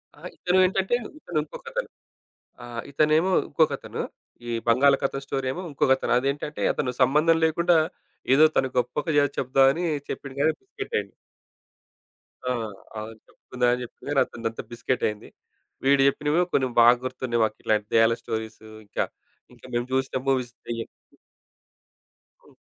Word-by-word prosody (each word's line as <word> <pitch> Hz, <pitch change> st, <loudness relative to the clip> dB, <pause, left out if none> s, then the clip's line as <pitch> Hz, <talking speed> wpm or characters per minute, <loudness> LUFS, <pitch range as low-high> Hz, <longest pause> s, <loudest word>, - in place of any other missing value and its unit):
ఆహ్, -, -, -9 dB
ఇతను 180 Hz, +1 st, +2 dB
ఏంటంటే, 190 Hz, +4 st, +1 dB, 0.2 s
ఇతనింకొకతను. -, -, -4 dB, 0.8 s
ఆహ్, 120 Hz, -1 st, -5 dB
ఇతనేమో 155 Hz, +5 st, +3 dB, 0.2 s
ఇంకొకతను. 150 Hz, -2 st, 0 dB, 0.5 s
ఈ -, -, -2 dB, 0.2 s
బంగాళకతం 135 Hz, +2 st, +3 dB
స్టోరీ 135 Hz, -1 st, -2 dB
ఏమో 180 Hz, -, -5 dB
ఇంకొకతను. 135 Hz, -1 st, +2 dB
అదేంటంటే, 140 Hz, +3 st, -3 dB
అతను 130 Hz, -4 st, -1 dB
సంబంధం 150 Hz, +6 st, +4 dB
లేకుండా 170 Hz, +2 st, +3 dB, 0.6 s
ఏదో 155 Hz, +3 st, +7 dB
తను 135 Hz, 0 st, +2 dB
గొప్పగా 145 Hz, +4 st, +2 dB
జెప్దామని 135 Hz, +5 st, +3 dB, 0.3 s
చెప్పిండు 140 Hz, -2 st, -6 dB
గాని 160 Hz, -, +4 dB
బిస్కటయింది. 405 Hz, +3 st, -4 dB, 1.4 s
ఆ! -, -, -1 dB, 0.5 s
అవును. 110 Hz, +1 st, -6 dB
చెప్పుకుందాం 125 Hz, -1 st, -2 dB
అని 125 Hz, -, -2 dB
చెప్పిండు 120 Hz, -, -12 dB
కానీ 145 Hz, -2 st, +3 dB
అతనిదంతా 115 Hz, -1 st, -5 dB
బిస్కెటయింది. 120 Hz, -3 st, -2 dB, 0.6 s
వీడు 140 Hz, 0 st, +5 dB
జెప్పినవి 150 Hz, +5 st, +2 dB
కొన్ని 130 Hz, -, +3 dB
బాగా 120 Hz, +1 st, +7 dB
గుర్తున్నాయి. 130 Hz, -2 st, -1 dB
మాకిట్లాంటి 105 Hz, -1 st, 0 dB
దెయ్యాల 115 Hz, 0 st, +5 dB
స్టోరీసు 110 Hz, -1 st, -5 dB, 0.2 s
ఇంకా, 100 Hz, -, -1 dB, 0.5 s
ఇంకా -, -, -17 dB
మేం 120 Hz, 0 st, +1 dB
చూసిన 130 Hz, 0 st, 0 dB
మూవీస్ 130 Hz, -3 st, 0 dB
దెయ్యాం 115 Hz, -1 st, -4 dB, 1.6 s
హ్మ్. -, -, -21 dB
135 Hz, 120 wpm, -25 LUFS, 120-155 Hz, 1.6 s, ఏదో